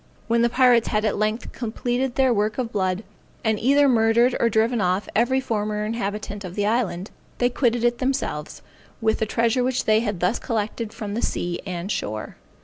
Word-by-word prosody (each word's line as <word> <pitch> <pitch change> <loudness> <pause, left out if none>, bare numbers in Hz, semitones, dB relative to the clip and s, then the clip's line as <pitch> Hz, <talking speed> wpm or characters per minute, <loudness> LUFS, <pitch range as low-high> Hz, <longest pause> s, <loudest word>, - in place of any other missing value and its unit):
When 230 0 +2
the 235 - +3
pirates 245 -2 +4
had 215 -1 0
at 215 - +1
length 215 +3 -1
completed 245 +2 -2
their 260 -2 +3
work 210 0 0
of 245 -3 -2
blood, 190 0 -1 0.4
and 220 -2 +1
either 280 +4 +4
murdered 235 0 +4
or 235 - +3
driven 225 +1 +2
off 185 +2 0
every 245 +4 +3
former 210 -3 -2
inhabitant 210 -2 -4
of 180 -1 -7
the 205 - 0
island, 210 -4 -1 0.3
they 245 0 +2
quitted 240 -2 +1
it 240 0 +2
themselves, 255 - -2 0.4
with 220 -1 +1
the 220 - 0
treasure 235 +3 +1
which 255 0 0
they 215 0 +4
had 210 -5 -2
thus 180 +7 +1
collected 225 -1 -3
from 215 -3 -6
the 230 - -2
sea 175 0 -2
and 180 +2 -4
shore. 110 - -4
225 Hz, 190 wpm, -23 LUFS, 205-240 Hz, 0.4 s, pirates